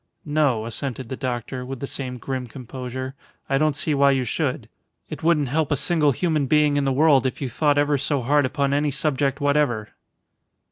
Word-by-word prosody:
"No," 145 -7 +1
assented 125 +1 -4
the 130 - -3
doctor, 125 -1 -4
with 130 0 -6
the 140 - -3
same 130 -2 -5
grim 130 0 -4
composure. 130 +1 -6 0.3
"I 135 0 +1
don't 155 -1 +2
see 150 +1 -1
why 140 0 +4
you 135 -2 +2
should. 120 - -2 0.4
It - - -6
wouldn't 155 -5 +2
help 155 +2 0
a 145 - +2
single 155 -1 +2
human 155 -1 0
being 150 0 +3
in 145 -1 +1
the 135 - +2
world 140 -1 +4
if 130 - -5
you 135 - -3
thought 145 +1 +2
ever 145 -1 +2
so 140 -1 0
hard 145 +2 +3
upon 140 +1 0
any 145 +1 +1
subject 140 0 0
whatever." 145 -7 +1
140 Hz, 195 wpm, -23 LUFS, 130-150 Hz, 0.4 s, why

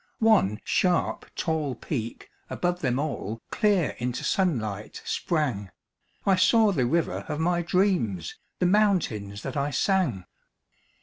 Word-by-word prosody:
One 210 - +3
sharp, 180 -2 +1
tall 155 -5 -1
peak 115 -2 -5 0.2
above 175 0 -1
them 125 -3 0
all 125 -7 -3
Clear 200 -7 +2
into 125 +1 -3
sunlight 110 - -1
sprang 135 - -1 0.6
I 195 -2 +4
saw 220 +2 +5
the 130 -10 +1
river 165 +6 0
of 150 0 -2
my 175 +1 +1
dreams, 170 - 0 0.2
The 180 - 0
mountains 175 - +1
that - - -5
I 140 0 0
sang! 145 - 0
155 Hz, 125 wpm, -26 LUFS, 115-185 Hz, 0.6 s, saw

